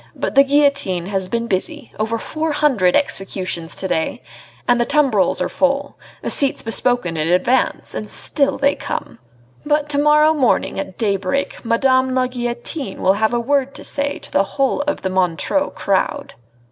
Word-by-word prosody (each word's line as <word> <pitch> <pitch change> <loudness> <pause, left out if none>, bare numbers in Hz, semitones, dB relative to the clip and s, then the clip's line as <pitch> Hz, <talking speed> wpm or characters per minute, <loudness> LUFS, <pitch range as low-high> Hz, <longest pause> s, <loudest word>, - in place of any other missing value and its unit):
But - - -3
the 275 - +7
guillotine 280 -11 +1
has 190 -1 -3
been 230 +3 -1
busy; 190 -5 -3
over 220 +1 -1
four 310 +6 -3
hundred 260 -12 +2
executions 185 - -2
to 190 - -2
day... 160 -3 -2 0.4
and 245 -1 +3
the - - +4
tumbrils 270 - +2
are - - 0
full 280 0 0 0.3
the - - -2
seats 280 -2 +1
bespoken 225 -6 0
in 155 +1 0
advance 180 +9 +1
and - - -5
still 280 -2 0
they 280 +1 +2
come.... - - -6 0.4
But 295 0 0
to 285 -1 +1
morrow 300 +1 +5
morning 265 -8 +1
at 190 -1 -6
daybreak 200 +5 -1
Madame 260 +2 +2
la 255 0 +2
Guillotine 240 0 -4
will 190 - +3
have 220 - +3
a 240 - 0
word 275 +2 0
to - - -6
say 285 0 0
to - - -9
the 195 - +3
whole 275 +1 +1
of 295 - -2
the 190 - 0
Montreux 185 - 0
crowd!" 195 -1 -1
245 Hz, 170 wpm, -19 LUFS, 195-280 Hz, 0.4 s, the